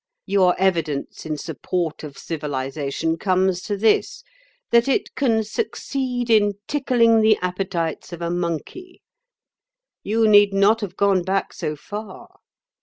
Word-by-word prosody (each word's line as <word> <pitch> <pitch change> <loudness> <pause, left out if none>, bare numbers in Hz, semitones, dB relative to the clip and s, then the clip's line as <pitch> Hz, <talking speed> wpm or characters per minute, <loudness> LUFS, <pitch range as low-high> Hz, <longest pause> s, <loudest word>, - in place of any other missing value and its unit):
Your 190 -2 +3
evidence 165 -6 -1
in 155 -1 -3
support 160 +2 -3
of 145 -3 -9
civilisation 150 +1 -3
comes 185 -1 +1
to 205 0 -3
this—that 485 - 0
it 270 - 0
can 230 -5 +1
succeed 250 - -3
in 205 -2 +4
tickling 235 -6 +3
the 215 -1 +4
appetites 180 -3 -3
of 170 - -7
a 170 0 -2
monkey. 175 - -5 1.0
You 220 +2 +1
need 205 -1 +5
not 210 +3 +4
have 195 -3 -6
gone 200 -2 +3
back 190 +2 -1
so 155 -3 -4
far. 205 +6 -9
195 Hz, 125 wpm, -22 LUFS, 170-225 Hz, 1.0 s, need